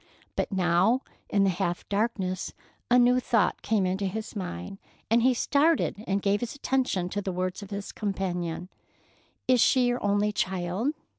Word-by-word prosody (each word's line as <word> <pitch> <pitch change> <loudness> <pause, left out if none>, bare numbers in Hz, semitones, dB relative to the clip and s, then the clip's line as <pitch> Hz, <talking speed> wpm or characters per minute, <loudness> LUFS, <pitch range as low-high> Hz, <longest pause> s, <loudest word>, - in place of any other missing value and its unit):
But - - -1
now, 190 +6 +3 0.3
in 200 -1 +3
the 195 - +3
half 175 0 -2
darkness, 200 -3 -1 0.4
a 245 - +6
new 250 +1 +5
thought 230 -3 +1
came 215 -4 +1
into 190 +2 0
his 220 +4 -5
mind, 185 - -5 0.3
and 230 +1 +5
he 255 +1 +4
started 285 -5 +2
and 195 0 0
gave 200 +1 +2
his 240 +4 -4
attention 260 -10 0
to 205 +2 -2
the 190 - -3
words 185 +2 -2
of 200 - -9
his 200 -1 -5
companion. 180 -4 -3 0.8
"Is 255 -2 +5
she 255 0 +4
your 245 0 0
only 205 +1 +2
child?" 190 - -1
200 Hz, 165 wpm, -27 LUFS, 185-240 Hz, 0.8 s, a